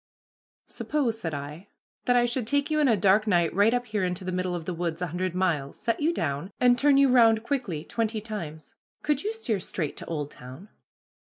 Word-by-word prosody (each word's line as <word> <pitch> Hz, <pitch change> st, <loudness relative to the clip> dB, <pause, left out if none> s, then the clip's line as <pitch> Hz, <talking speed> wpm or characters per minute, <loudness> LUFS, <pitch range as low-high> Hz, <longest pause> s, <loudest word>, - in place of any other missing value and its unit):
"Suppose," 255 Hz, -7 st, -2 dB
said 165 Hz, -7 st, -3 dB
I, 145 Hz, +6 st, -7 dB, 0.4 s
"that 245 Hz, -, +3 dB
I 240 Hz, 0 st, +4 dB
should 240 Hz, -1 st, -2 dB
take 285 Hz, +4 st, +1 dB
you 305 Hz, -, +2 dB
in 295 Hz, -, +4 dB
a 225 Hz, -4 st, +3 dB
dark 200 Hz, +3 st, +3 dB
night 175 Hz, -5 st, +2 dB
right 205 Hz, +5 st, +4 dB
up 245 Hz, 0 st, 0 dB
here 215 Hz, -4 st, -2 dB
into 180 Hz, 0 st, -2 dB
the 185 Hz, -, -2 dB
middle 185 Hz, 0 st, -1 dB
of 165 Hz, -2 st, -5 dB
the 180 Hz, -, -3 dB
woods 170 Hz, -1 st, -3 dB
a 180 Hz, -, -1 dB
hundred 180 Hz, +1 st, -3 dB
miles, 160 Hz, -7 st, -1 dB
set 230 Hz, -, -1 dB
you 310 Hz, +3 st, +2 dB
down, 155 Hz, -, -2 dB
and 245 Hz, -1 st, +5 dB
turn 275 Hz, +2 st, +4 dB
you 275 Hz, 0 st, +6 dB
round 225 Hz, -3 st, +5 dB
quickly 235 Hz, -, -2 dB
twenty 225 Hz, -1 st, -2 dB
times, 170 Hz, -8 st, -7 dB, 0.3 s
could 295 Hz, -2 st, 0 dB
you 425 Hz, -, -1 dB
steer 250 Hz, -, -2 dB
straight 165 Hz, -4 st, -3 dB
to -, -, -6 dB
Oldtown?" 145 Hz, +2 st, -7 dB
205 Hz, 210 wpm, -27 LUFS, 170-245 Hz, 0.4 s, you